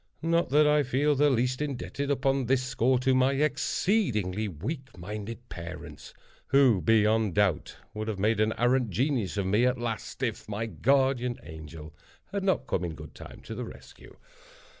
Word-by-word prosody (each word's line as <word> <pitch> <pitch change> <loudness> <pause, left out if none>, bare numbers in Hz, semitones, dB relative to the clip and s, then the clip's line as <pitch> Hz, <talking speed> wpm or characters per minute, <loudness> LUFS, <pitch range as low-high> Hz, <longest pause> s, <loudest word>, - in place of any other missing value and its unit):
Not 170 -1 +2
that 150 +3 +5
I 150 0 +4
feel 140 +2 +1
the 145 +1 +3
least 125 +1 0
indebted, 140 0 -3
upon 135 -2 +1
this 130 0 +2
score, 130 0 +1
to 130 +1 +2
my 130 +1 +3
exceedingly 135 - 0
weak 130 - -6
minded 105 +6 -7
parents, 85 -4 -9 0.3
who, 130 -8 +4
beyond 110 0 +3
doubt, 100 -6 +1 0.2
would 110 0 -4
have 110 -3 -2
made 105 +2 +1
an 110 +1 +2
arrant 120 0 +2
genius 120 - -1
of 100 - 0
me 105 +5 +2
at 125 0 +2
last, 120 +2 -4
if 115 -3 -3
my 110 +2 -2
guardian 130 0 +1
angel 80 -1 -10 0.4
had 200 -1 -2
not 190 -1 +1
come, 90 - -1
in 85 -2 -4
good 75 -2 -11
time, - - -11
to - - -7
the - - -4
rescue. - - -12
120 Hz, 170 wpm, -28 LUFS, 105-135 Hz, 0.4 s, that